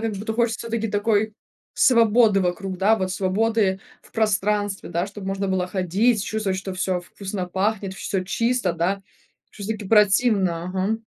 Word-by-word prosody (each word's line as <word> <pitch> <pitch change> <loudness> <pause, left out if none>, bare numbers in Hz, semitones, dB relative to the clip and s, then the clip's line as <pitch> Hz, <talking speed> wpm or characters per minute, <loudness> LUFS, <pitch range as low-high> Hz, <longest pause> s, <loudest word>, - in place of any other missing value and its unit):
Как 225 -1 -2
будто 205 +3 -4
хочется 230 0 0
всё-таки 225 -1 -1
такой 210 +1 +1 0.4
свободы 225 -4 +4
вокруг, 185 +1 -2
да, 210 +4 +4
вот, 185 -3 -2
свободы 195 0 +1 0.2
в - - -22
пространстве, 205 -2 0
да, 175 +2 -1
чтоб 205 -1 -9
можно 195 0 -2
было 185 -1 0
ходить, 195 +5 +1
чувствовать, 205 -3 -2
что 190 0 -5
всё 185 -1 -1
вкусно 190 +1 -6
пахнет, 195 +1 -1
всё 190 0 -2
чисто, 230 -1 0
да. 180 +4 -1 0.5
Шось-таки 210 0 -5
противно, 200 -5 +3
ага. 190 +4 -1
200 Hz, 150 wpm, -23 LUFS, 190-220 Hz, 0.5 s, свободы